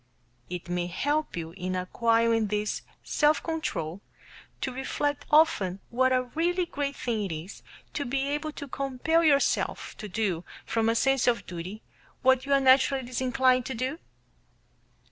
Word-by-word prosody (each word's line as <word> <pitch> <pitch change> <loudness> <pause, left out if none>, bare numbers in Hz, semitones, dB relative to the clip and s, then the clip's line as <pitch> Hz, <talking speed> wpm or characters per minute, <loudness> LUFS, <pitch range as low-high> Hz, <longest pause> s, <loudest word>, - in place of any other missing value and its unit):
It 180 -1 -5
may 175 0 -1
help 290 - -1
you 165 -1 -4
in 185 +1 -4
acquiring 230 +4 +2
this 210 +1 -1 0.2
self 300 +1 +2
control 200 - -3 0.6
to 260 - -1
reflect 285 +2 -2
often 295 - +4
what 260 +2 +3
a 255 0 +3
really 345 +7 0
great 280 -3 -3
thing 225 -4 -2
it 190 - -4
is 160 +5 -7 0.3
to 290 - -2
be 270 +2 -1
able 295 +2 -2
to 285 - -7
compel 275 +5 0
yourself 280 -3 +2
to 210 - -6
do 180 -4 -1 0.2
from 225 -1 +1
a 230 - +2
sense 270 +2 +2
of 235 -1 +2
duty 180 +5 -7 0.4
what 260 +1 +4
you 280 - +2
are 275 - +6
naturally 265 0 +4
disinclined 255 0 +2
to 265 - -4
do? 260 +7 -2
255 Hz, 155 wpm, -28 LUFS, 210-280 Hz, 0.6 s, are